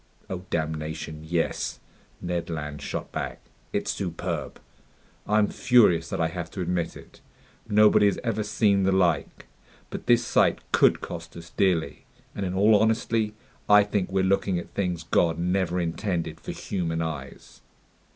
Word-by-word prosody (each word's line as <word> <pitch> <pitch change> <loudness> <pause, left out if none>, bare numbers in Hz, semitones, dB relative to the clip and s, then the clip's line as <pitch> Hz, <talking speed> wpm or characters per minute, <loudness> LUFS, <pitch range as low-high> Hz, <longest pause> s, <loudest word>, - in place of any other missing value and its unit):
"Oh 90 0 -5
damnation, 80 -1 -3
yes!" 80 +1 -2 0.4
Ned 85 -1 -3
Land 75 -3 -5
shot - - -5
back. - - -4 0.3
"It's - - -1
superb! 85 -4 -4 0.7
I'm 105 0 +3
furious 105 -10 +4
that 95 - -3
I 80 - +2
have 85 -1 -5
to 95 - -5
admit 85 -1 -2
it. - - -16 0.5
Nobody 105 0 +6
has 100 - +1
ever 115 -3 -1
seen 105 -1 +2
the 95 0 +2
like. 90 -4 +1 0.5
But - - -7
this 120 0 +4
sight - - +3
could - - +4
cost - - -7
us 85 -1 -11
dearly. 80 -7 0 0.3
And 100 - -3
in 90 - -3
all 105 +3 +5
honesty, 110 0 +1 0.3
I 105 0 +8
think 100 -2 -2
we're 95 0 +1
looking 95 -1 +1
at 85 - -7
things 90 -4 -2
God 85 0 +2
never 90 +1 0
intended 85 +1 -2
for - - -5
human 85 -4 -2
eyes." 75 -4 -7
90 Hz, 150 wpm, -26 LUFS, 80-100 Hz, 0.7 s, I